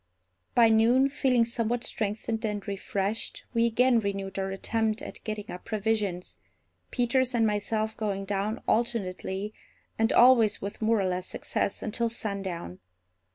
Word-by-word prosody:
By 235 -2 +7
noon, 235 +5 +4
feeling 260 -4 +2
somewhat 235 +1 -1
strengthened 220 +1 -2
and 210 -1 -3
refreshed, 200 +2 -2
we 230 0 +3
again 240 +1 +4
renewed 195 -2 -3
our 195 0 -1
attempt 220 +3 -1
at - - -8
getting 215 -1 -5
up 180 - -8
provisions, 210 -4 -2 0.5
Peters 250 +1 +1
and 225 -1 +3
myself 215 +1 0
going 200 -2 -2
down 205 +3 -2
alternately, 210 -3 -1 0.5
and 225 0 +3
always 240 -4 +6
with 200 +3 -6
more 220 0 +3
or 195 - +1
less 180 0 -2
success, 200 - -2
until 230 +2 0
sundown. 195 - -4
215 Hz, 140 wpm, -28 LUFS, 200-230 Hz, 0.5 s, By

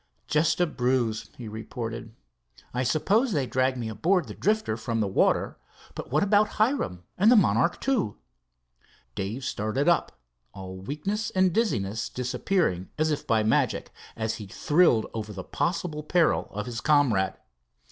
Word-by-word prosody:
"Just 150 +1 +1
a 175 - +4
bruise," 125 -6 -1
he 120 - -7
reported. 115 +1 -6 0.6
"I 125 - 0
suppose 200 - +2
they, 140 -5 +1
dragged 130 +2 0
me 120 -2 -3
aboard 170 - +1
of - - -14
the - - -5
Drifter 215 - 0
from 115 0 -3
the 105 - +1
water, 95 - +1 0.3
but - - -7
what 150 +7 +2
about 205 +1 +3
Hiram 215 - 0 0.2
and 210 +5 +6
the - - +7
Monarch 170 - +2
II?" 245 - +1 1.0
Dave 105 +7 -4
started 130 +1 -1
up, 170 - +1 0.4
all 95 -1 -8
weakness 150 - -3
and 185 -2 +2
dizziness 110 - 0
disappearing 125 - -1
as 155 0 +1
if 150 - -3
by 110 -1 +3
magic, 110 -2 +1 0.2
as 110 0 -2
he 105 - -8
thrilled 145 - +3
over 110 -1 -5
the 95 -2 -6
possible 165 - -2
peril 165 +1 +2
of 105 +1 -5
his 120 -2 -5
comrade. 130 -11 +3
130 Hz, 155 wpm, -26 LUFS, 110-175 Hz, 1.0 s, the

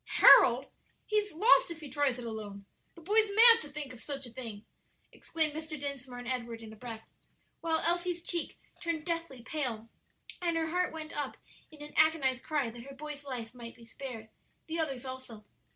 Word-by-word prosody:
"Harold? - - +8 0.4
He's 425 -1 0
lost 430 +7 +5
if 335 -1 -7
he 305 - -8
tries 285 -3 +1
it 245 - -7
alone!" 210 -3 -7 0.3
"The 335 - -13
boy's 425 +4 +3
mad 460 +1 +9
to 300 - -8
think 285 -2 -6
of 245 - -11
such 275 +1 -5
a 245 - -10
thing!" 225 -4 -7 0.5
exclaimed 315 -2 -1
Mr. 310 -1 -6
Dinsmore 270 -3 -5
and 245 -1 -7
Edward 235 -3 -3
in 220 -1 -10
a - - -11
breath, 225 0 -8 0.5
while 325 -1 0
Elsie's 345 0 0
cheek 345 -2 -2 0.2
turned 335 -3 -2
deathly 330 -8 -3
pale, 235 -7 -2 0.5
and 340 -2 +1
her 325 - +1
heart 360 +1 +1
went 315 -1 -7
up 290 -3 -3 0.3
in 300 -1 -12
an 295 - -10
agonized 280 -5 +3
cry 290 -7 -1
that 235 +1 -10
her 275 +3 -11
boy's 295 0 -7
life 245 -4 -5
might 235 -2 -9
be 235 - -15
spared; 230 -2 -8 0.4
the 330 +1 -3
others 270 -5 -2
also. 255 -5 -8
280 Hz, 190 wpm, -31 LUFS, 245-325 Hz, 0.5 s, mad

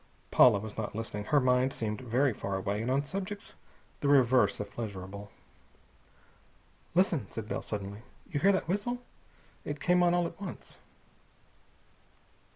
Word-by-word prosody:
Paula 120 -5 +7
was 105 +1 -7
not 110 - -4
listening. 105 -2 -4
Her 145 - +4
mind 125 0 +3
seemed 105 -2 -3
very 125 +2 +2
far 100 -1 -3
away, 100 +2 -1
and 115 - -2
on 135 +2 +2
subjects 195 +5 -5 0.5
the 145 - -1
reverse 130 -6 +4
of 105 -1 -5
pleasurable. 100 -2 -6 1.7
"Listen!" 170 - +2
said 110 -2 -6
Bell - - -2
suddenly. 100 0 -5 0.3
"You 145 - 0
hear 195 +6 +5
that 190 - 0
whistle? 240 +7 -1 0.6
It 145 0 -4
came 180 +3 +3
on 175 0 +4
all 175 -1 +2
at 170 +3 -7
once!" 200 - -8
125 Hz, 150 wpm, -30 LUFS, 105-175 Hz, 1.7 s, Paula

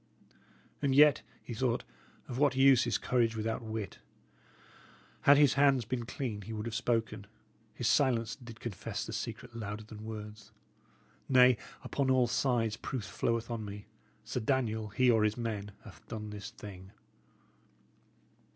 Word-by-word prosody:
"And 140 -2 +2
yet," 150 0 +7 0.2
he 120 - -6
thought, 120 +1 0 0.4
"of 125 0 -5
what 140 -2 +3
use 135 -2 +6
is 115 - +1
courage 115 -3 +1
without 110 +1 -2
wit? 110 -3 -5 1.3
Had 140 - +9
his 145 -2 +6
hands 140 -3 +4
been 120 0 -3
clean, 125 -6 -4
he 110 +3 -7
would 105 0 -4
have 115 - -4
spoken; 115 -3 -1 0.5
his 120 - -1
silence 125 -4 +2
did 120 -4 -12
confess 110 -6 -5
the - - -7
secret 115 +2 -5
louder 105 -1 -5
than 110 0 -10
words. 110 0 -8 0.8
Nay, 125 -1 +7 0.3
upon 140 -2 -1
all 130 -1 +4
sides, 120 -2 0
proof 125 -1 -4
floweth 115 +2 -2
on 115 -2 -3
me. 105 0 -8 0.4
Sir 115 +3 -3
Daniel, 110 -3 0
he 125 +4 +3
or 110 -2 +3
his 105 +1 +1
men, 105 -4 -3
hath 95 -9 -14
done 105 -2 -6
this 105 -1 -7
thing." 95 -1 -11
115 Hz, 150 wpm, -32 LUFS, 110-130 Hz, 1.3 s, Had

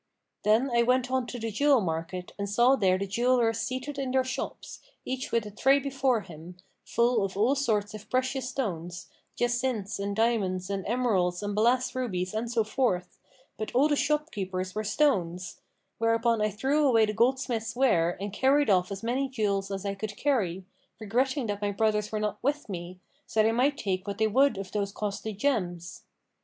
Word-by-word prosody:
Then 225 +5 +3
I 235 0 +3
went 250 +1 +2
on 260 -2 0
to 245 - -6
the 225 -1 -3
jewel 280 +4 +4
market 175 0 -4
and 200 0 -2
saw 240 +6 +4
there 190 -6 +2
the 200 - -2
jewellers 235 +2 +2
seated 260 +4 -4
in 270 -1 -2
their 260 0 +2
shops, 255 -1 -5 0.3
each 260 0 -4
with 230 -2 +1
a 210 - -7
tray 270 +6 +4
before 270 -4 0
him, 175 0 -11 0.3
full 235 -2 +2
of 195 -1 -3
all 225 +6 +3
sorts 220 -7 0
of 215 0 -10
precious 260 0 -1
stones, 175 -9 -4 0.2
jacinths 240 -4 -1
and 200 0 -2
diamonds 200 -5 0
and 195 -1 -3
emeralds 205 -6 +1
and 205 0 -2
balass 245 +4 +2
rubies 185 -8 -2
and 230 +2 -2
so 230 -2 +2
forth: 215 -5 -1 0.4
but 215 +2 -5
all 275 +4 +5
the 295 - +2
shop 300 +2 0
keepers 185 -2 -4
were 215 - -2
stones; 185 - 0 0.4
whereupon 230 0 +2
I 215 - +2
threw 270 +9 +1
away 225 -4 +5
the 210 - -3
goldsmiths' 235 -1 0
ware 175 -10 +2
and 200 0 -5
carried 275 +1 +3
off 180 0 +2
as 195 +2 -6
many 260 +4 0
jewels 200 -6 -1
as 195 0 -4
I 200 - -1
could 200 +1 -6
carry, 190 -11 0 0.3
regretting 255 +5 0
that 205 -1 -3
my 205 - 0
brothers 210 0 0
were 215 - -1
not 210 0 -2
with 290 +3 -1
me, 180 -2 -7 0.3
so 220 - +2
they 220 - +3
might 265 +5 +2
take 190 -2 -2
what 200 -1 -3
they 220 - +2
would 265 +3 +3
of 195 -1 -6
those 200 -1 -1
costly 210 +1 -4
gems. 180 -7 -2
220 Hz, 190 wpm, -28 LUFS, 195-255 Hz, 0.4 s, all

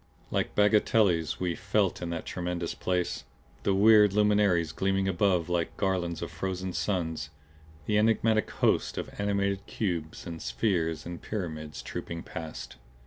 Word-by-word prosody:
Like - - -1
bagatelles 105 -5 +3
we 90 -2 0
felt 100 +2 0
in 85 - -3
that 85 -1 -4
tremendous 90 -1 -3
place, 90 -1 -1 0.4
the 100 - +1
weird 105 0 +6
luminaries 100 -6 +3
gleaming 95 +3 0
above 90 -2 +2
like 85 -2 -1
garlands 90 -4 -1
of 85 - -5
frozen 95 +2 -3
suns, 80 -7 -2 0.6
the 105 +5 +2
enigmatic 110 0 +2
hosts - - +1
of - - -4
animate 100 -1 0
cubes 85 -7 -3
and 85 -2 -6
spheres 80 -7 -1
and 85 0 -7
pyramids 80 -8 -5
trooping 85 0 -5
past. 80 -6 -7
90 Hz, 140 wpm, -29 LUFS, 85-100 Hz, 0.6 s, weird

